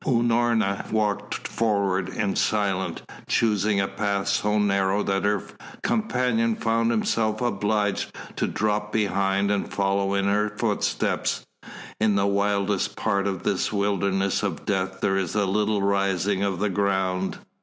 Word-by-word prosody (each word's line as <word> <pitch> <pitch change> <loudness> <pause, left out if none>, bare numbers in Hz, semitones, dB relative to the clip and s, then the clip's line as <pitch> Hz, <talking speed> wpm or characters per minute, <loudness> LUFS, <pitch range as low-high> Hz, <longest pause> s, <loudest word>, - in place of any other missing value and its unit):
Unorna 115 -4 +1
walked 105 -2 -1
forward 100 -4 0
in 100 -1 -1
silence, 100 -3 0 0.3
choosing 105 -2 +2
a 95 - +1
path 100 0 -1
so 105 0 +1
narrow 100 -1 +2
that 95 0 0
her 105 -2 +1 0.4
companion 125 - +1
found 115 +1 +1
himself 110 -1 0
obliged 105 -3 0 0.2
to - - 0
drop 105 0 -1
behind 100 -2 +1
and 100 - -1
follow 100 0 0
in 100 0 +1
her 105 +1 +2
footsteps. - - -1 0.5
In 105 -1 +3
the 100 0 +2
wildest 100 0 0
part 100 0 0
of 95 -3 -3
this - - 0
wilderness 100 -1 0
of 100 -6 -3
death 95 -2 -1
there 95 0 +2
is 95 -1 -2
a 105 -1 +2
little 105 +1 +1
rising 100 -1 +1
of 100 -2 0
the 105 +3 0
ground. 95 -1 0
100 Hz, 140 wpm, -25 LUFS, 95-105 Hz, 0.5 s, In